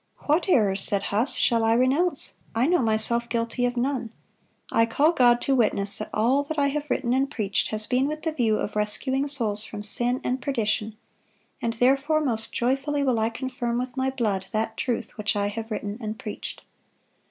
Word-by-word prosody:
"What 315 +6 +1
errors," 200 - +2
said 200 0 +2
Huss, 245 +5 +1
"shall 230 -3 +2
I 225 0 +3
renounce? 275 +7 +1 0.2
I 235 +3 +2
know 350 0 +2
myself 235 +1 +1
guilty 235 +1 -1
of 245 0 -5
none. 255 -2 -2 0.6
I 230 - +3
call 290 +8 +2
God 245 -6 +4
to 275 - 0
witness 205 -5 +3
that - - -6
all 245 +6 +2
that 310 +2 -6
I 280 -1 +2
have 295 +1 -4
written 245 -2 0
and 270 +1 +1
preached 210 -8 -1
has 215 0 -1
been 255 +3 0
with 305 +1 -5
the 320 - -1
view 230 -7 0
of 205 - -4
rescuing 260 +6 0
souls 220 -7 +1
from 210 -1 -8
sin 240 +4 +7
and 255 +1 -2
perdition; 220 -4 -2 0.6
and, 230 - -1
therefore, 270 +6 +2
most 230 -7 -1
joyfully 275 +4 -1
will 255 -4 +1
I 220 +1 +1
confirm 240 0 -4
with 250 +1 -4
my 265 0 0
blood 210 -8 -2
that 220 +1 -2
truth 240 -2 -4
which 210 +1 +1
I 205 0 0
have 225 +2 -6
written 210 0 -5
and 215 0 -5
preached." 210 - -7
240 Hz, 195 wpm, -24 LUFS, 220-270 Hz, 0.6 s, sin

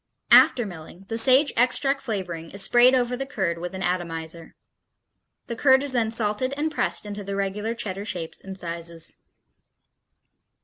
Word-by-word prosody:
After 250 -3 +6
milling, 175 0 -11
the 225 - -1
sage 265 +5 +4
extract 270 +3 +2
flavoring 180 -9 -5
is 200 0 +1
sprayed 240 +5 +5
over 250 -1 0
the 270 +2 -5
curd 185 -10 -2
with 180 +2 -6
an 190 - -5
atomizer. 165 -2 -3 0.9
The 235 - -5
curd 265 +2 +4
is 285 - -1
then 235 -3 0
salted 225 +4 -1
and 310 +2 -1
pressed 300 - 0
into 205 0 -6
the 200 0 -5
regular 205 +3 -2
Cheddar 200 -3 -5
shapes 170 -6 -6
and 190 0 -8
sizes. 170 -2 -3
205 Hz, 160 wpm, -24 LUFS, 175-250 Hz, 0.9 s, After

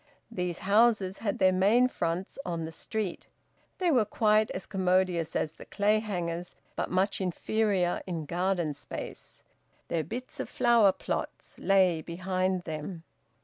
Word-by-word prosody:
These 180 -5 -2
houses 205 -2 +3
had 205 -3 -1
their 190 -1 +5
main 210 +7 +4
fronts 175 -1 -3
on 165 -2 -3
the 160 - -6
street; 200 +3 -4 0.5
they 360 -2 +2
were 250 -6 +4
quite 215 0 +2
as 185 - -5
commodious 185 -3 +1
as 155 - 0
the - - -13
Clayhangers', 200 -5 -1 0.2
but - - -2
much 190 +2 +1
inferior 190 0 0
in 165 -4 -3
garden 175 -1 0
space; 145 - -8 0.5
their 165 -2 0
bits 250 +7 -7
of - - -3
flower 235 -5 +5
plots - - -5
lay 185 -4 +3
behind 185 +2 -1
them. 160 +2 -6
185 Hz, 140 wpm, -29 LUFS, 175-210 Hz, 0.5 s, their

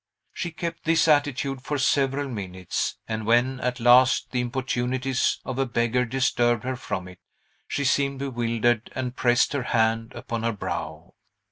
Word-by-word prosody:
She 175 - -3
kept 170 +1 -5
this 165 0 +3
attitude 145 -3 +1
for 145 +2 -3
several 140 0 +1
minutes, 95 -7 -3
and 110 -1 -3
when, 125 +3 +3
at 125 0 -2
last, 125 +2 +5
the 125 - 0
importunities 125 +1 -1
of 130 0 -4
a 135 - +1
beggar 120 +1 +1
disturbed 120 -2 +1
her 130 +1 -2
from 95 -6 -5
it, 90 -1 -13 0.5
she 145 - -2
seemed 140 0 +1
bewildered 120 -3 0
and 125 -1 -3
pressed 120 +1 +2
her 140 - 0
hand 115 0 0
upon 115 -1 -4
her 115 0 0
brow. 85 -4 -5
125 Hz, 155 wpm, -25 LUFS, 115-135 Hz, 0.5 s, last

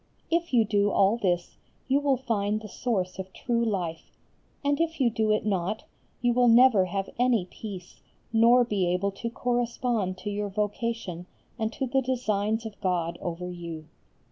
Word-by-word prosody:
If 340 +1 +1
you 235 -4 +4
do 205 -1 +2
all 195 +2 +4
this 175 -5 -1 0.3
you 275 +1 +3
will 280 -2 +2
find 215 -4 -1
the 215 - -9
source 190 -4 -2
of 190 0 -6
true 235 -1 0
life, 180 -7 -3 0.5
and 285 +2 +2
if 330 -1 -1
you 245 -3 +3
do 220 0 0
it 215 0 +1
not, 195 +1 -1 0.4
you 240 0 +3
will 245 0 +4
never 230 -4 +6
have 195 +1 -3
any 245 -6 +3
peace 185 -1 -9 0.3
nor 235 +2 +6
be 200 -6 0
able 180 +3 0
to 230 +4 -5
correspond 240 -5 -1
to 205 +3 -5
your 205 0 -2
vocation 210 -3 -3 0.3
and 220 0 0
to 265 - -2
the 265 +2 +1
designs 220 -4 -1
of 215 -3 -8
God 170 -3 -1
over 175 +1 -4
you. 165 -3 -7
215 Hz, 170 wpm, -27 LUFS, 185-240 Hz, 0.5 s, never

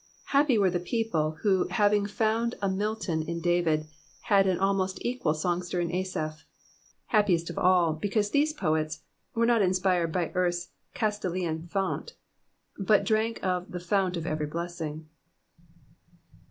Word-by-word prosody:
Happy 280 -3 +4
were 195 -3 +3
the 175 - 0
peopHe 175 -6 -1
who 190 -3 +3
having 205 -2 +2
foutxd 225 +2 0
a 200 - 0
Milton 195 -4 -1
in 170 +1 -4
David 170 -3 +1 0.4
had 200 -3 +3
am 185 -2 +2
alrnost 195 -1 0
equal 245 -10 0
songster 175 +2 -1
in 170 0 -1
Asaph: 155 -4 -3 0.7
happiest 180 -6 +2
of - - -5
all, 180 -3 +4
because 205 +5 -1
these 295 +2 +3
poets 155 - -1 0.3
were 230 0 +3
not 235 -2 +4
inspired 185 -3 +2
by 175 -1 -1
eartKs 175 -1 -1 0.3
Castalian 180 -6 -2
fount, 195 - -2 0.6
but 205 +1 +3
drank 220 +1 0
of 180 -1 -1
the 180 - -5
fount 180 0 0
of 165 - -4
every 155 -2 -2
blessing." 160 -1 -5
185 Hz, 140 wpm, -28 LUFS, 170-210 Hz, 0.7 s, Happy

